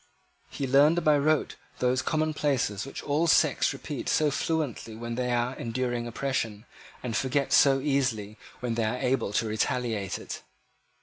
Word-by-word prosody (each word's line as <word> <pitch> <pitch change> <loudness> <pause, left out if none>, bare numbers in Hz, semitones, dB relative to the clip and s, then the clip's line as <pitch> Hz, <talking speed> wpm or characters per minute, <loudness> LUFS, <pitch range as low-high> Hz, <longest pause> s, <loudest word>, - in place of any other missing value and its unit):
He 140 - -4
learned 145 +6 +4
by 155 -2 +5
rote 150 +1 +1 0.2
those 125 +1 +1
commonplaces 145 -8 0
which 135 - -7
all 150 +4 +1
sects - - +3
repeat - - -5
so 150 -2 +3
fluently 140 -7 -2
when 120 +1 -5
they 125 +1 -1
are 120 +2 0
enduring 120 0 -2
oppression, 115 -3 -3 0.4
and 120 -3 -3
forget 135 +4 0
so 135 -1 +6
easily 125 -7 -1 0.2
when 120 -2 -1
they 115 -1 0
are 110 +3 -1
able 125 -5 0
to 115 - +1
retaliate 110 -2 -1
it. - - -7
125 Hz, 150 wpm, -27 LUFS, 115-145 Hz, 0.4 s, so